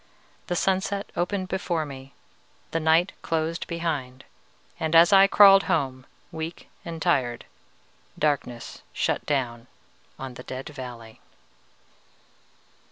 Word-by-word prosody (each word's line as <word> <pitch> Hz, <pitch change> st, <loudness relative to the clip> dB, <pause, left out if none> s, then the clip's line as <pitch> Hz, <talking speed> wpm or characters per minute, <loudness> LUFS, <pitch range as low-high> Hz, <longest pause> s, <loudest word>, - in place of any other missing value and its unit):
The 175 Hz, -, -1 dB
sunset 195 Hz, +2 st, 0 dB
opened 185 Hz, +2 st, -1 dB
before 175 Hz, -4 st, -1 dB
me, 135 Hz, -2 st, -10 dB, 0.6 s
the 165 Hz, -, 0 dB
night 165 Hz, +3 st, +3 dB
closed 165 Hz, +1 st, -2 dB
behind, 150 Hz, -7 st, -3 dB, 0.5 s
and 160 Hz, 0 st, 0 dB
as 170 Hz, +5 st, +7 dB
I 195 Hz, 0 st, +8 dB
crawled 195 Hz, -1 st, +7 dB
home 135 Hz, -7 st, -1 dB, 0.2 s
weak 160 Hz, +1 st, -6 dB
and 165 Hz, -1 st, -6 dB
tired, 130 Hz, -8 st, 0 dB, 0.7 s
darkness 135 Hz, -5 st, -2 dB
shut -, -, 0 dB
down 125 Hz, -4 st, -1 dB, 0.5 s
on 130 Hz, -1 st, -7 dB
the 125 Hz, -, -10 dB
Dead 130 Hz, +2 st, -7 dB
Valley." 120 Hz, -6 st, -9 dB
160 Hz, 110 wpm, -25 LUFS, 130-175 Hz, 0.7 s, I